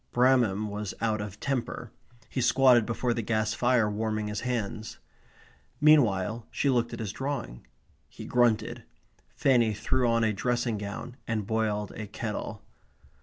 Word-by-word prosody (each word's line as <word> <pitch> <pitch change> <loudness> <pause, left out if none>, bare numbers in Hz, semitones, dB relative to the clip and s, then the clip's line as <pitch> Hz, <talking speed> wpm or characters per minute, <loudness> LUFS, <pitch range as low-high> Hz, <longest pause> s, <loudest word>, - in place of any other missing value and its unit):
Bramham 120 -5 +3
was 105 -1 -5
out 110 -2 0
of 105 0 -7
temper. 135 -4 -3 0.4
He 130 - -3
squatted 125 -2 +5
before 120 +1 0
the 115 - -2
gas 110 0 0
fire 120 -2 +2
warming 110 0 -2
his 105 - -3
hands. 110 -2 -3 0.8
Meanwhile 115 -7 +3
she 140 - +1
looked 120 -2 +1
at 115 - -6
his 110 -4 -3
drawing. 60 - -5 0.4
He - - -10
grunted. 120 -3 +1 0.5
Fanny 120 -5 +3
threw 125 +3 +1
on 115 0 +2
a 110 -1 +2
dressing 120 0 -1
gown 105 +5 -6
and 110 -3 -1
boiled 105 -1 -1
a 110 - -7
kettle. 105 0 -5
115 Hz, 145 wpm, -28 LUFS, 105-125 Hz, 0.8 s, squatted